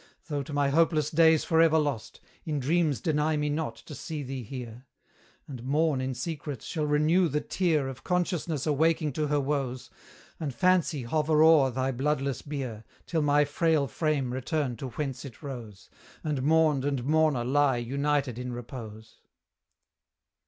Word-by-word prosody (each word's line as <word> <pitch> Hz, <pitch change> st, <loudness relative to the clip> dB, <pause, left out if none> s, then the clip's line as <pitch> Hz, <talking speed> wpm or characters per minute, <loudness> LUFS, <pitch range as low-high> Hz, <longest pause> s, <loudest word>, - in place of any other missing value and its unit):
Though 145 Hz, -2 st, -1 dB
to 140 Hz, -, -8 dB
my 145 Hz, -1 st, +1 dB
hopeless 160 Hz, +1 st, +2 dB
days 160 Hz, -1 st, +5 dB
for 160 Hz, 0 st, +3 dB
ever 160 Hz, -1 st, +5 dB
lost, 145 Hz, -7 st, -2 dB, 0.2 s
In 150 Hz, -2 st, -2 dB
dreams 150 Hz, -2 st, +1 dB
deny 155 Hz, +1 st, +1 dB
me 150 Hz, 0 st, 0 dB
not 155 Hz, +1 st, -2 dB
to 155 Hz, -, -12 dB
see 150 Hz, 0 st, -5 dB
thee 130 Hz, 0 st, -5 dB
here! 125 Hz, +1 st, -8 dB, 0.6 s
And 130 Hz, -5 st, -8 dB
Morn 145 Hz, +1 st, +1 dB
in 130 Hz, 0 st, -3 dB
secret 145 Hz, -5 st, -5 dB
shall 155 Hz, -3 st, -2 dB
renew 155 Hz, +5 st, +3 dB
the 150 Hz, -1 st, 0 dB
tear 160 Hz, -5 st, 0 dB
Of 130 Hz, -1 st, -8 dB
Consciousness 175 Hz, -5 st, -1 dB
awaking 155 Hz, 0 st, +1 dB
to 150 Hz, +1 st, -1 dB
her 145 Hz, 0 st, +1 dB
woes, 135 Hz, -3 st, -2 dB, 0.5 s
And 145 Hz, -5 st, -4 dB
Fancy 180 Hz, -6 st, +2 dB
hover 155 Hz, +4 st, +2 dB
o'er 160 Hz, -4 st, +6 dB
thy 130 Hz, +1 st, -1 dB
bloodless 135 Hz, 0 st, -1 dB
bier, 130 Hz, -7 st, -5 dB, 0.2 s
Till 165 Hz, -2 st, -1 dB
my 145 Hz, 0 st, +3 dB
frail 155 Hz, 0 st, +1 dB
frame 140 Hz, -1 st, -1 dB
return 130 Hz, 0 st, -2 dB
to 135 Hz, -, -5 dB
whence 135 Hz, -1 st, -4 dB
it 135 Hz, +1 st, -11 dB
rose, 115 Hz, -8 st, -8 dB, 0.4 s
And 150 Hz, -4 st, -1 dB
mourned 155 Hz, -1 st, +3 dB
and 140 Hz, -3 st, -1 dB
mourner 155 Hz, -4 st, +2 dB
lie 140 Hz, 0 st, +3 dB
united 140 Hz, 0 st, -1 dB
in 125 Hz, 0 st, -4 dB
repose. 110 Hz, -2 st, -9 dB
145 Hz, 160 wpm, -28 LUFS, 130-155 Hz, 0.6 s, o'er